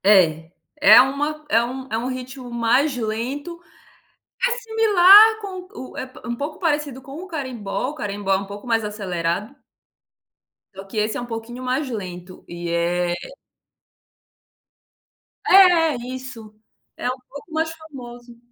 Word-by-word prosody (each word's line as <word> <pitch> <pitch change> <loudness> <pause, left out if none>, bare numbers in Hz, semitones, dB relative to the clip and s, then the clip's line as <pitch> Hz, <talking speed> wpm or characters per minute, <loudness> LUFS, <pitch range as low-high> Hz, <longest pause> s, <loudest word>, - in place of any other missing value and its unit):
É, 165 -5 +4 0.3
é 295 - +9
uma 295 +3 -2
é 230 -5 +3
um 260 +2 -6
é 220 - 0
um 235 +2 -3
ritmo 255 0 -6
mais 245 +5 +2
lento. 255 +10 -4 0.9
É - - -1
similar 440 -2 +6
com 370 -3 -7 0.2
o - - -13
é - - -3
p 255 - -15
um 240 - -2
pouco 285 +5 -5
parecido 295 -6 -1
com 270 +1 -12
o - - -10
Carimbó, 255 - -4
o 300 - -8
Carimbó 200 -5 -2
é - - +3
um 195 - -5
pouco 200 +2 -10
mais 225 -1 +1
acelerado 195 0 -3 1.2
só 195 - -8
que 205 - -8
esse 215 +1 0
é - - -4
um - - -5
pouquinho 240 +1 -7
mais 260 +2 -1
lento, 185 -5 -7
e 175 0 -6
é 175 +1 0 2.4
É, 350 -5 +6 0.2
isso. 235 -5 -9 0.4
É - - -3
um 255 - -3
pouco 285 +4 -11
mais 320 +1 -1
famoso. 245 -7 -12
250 Hz, 150 wpm, -22 LUFS, 210-300 Hz, 2.4 s, é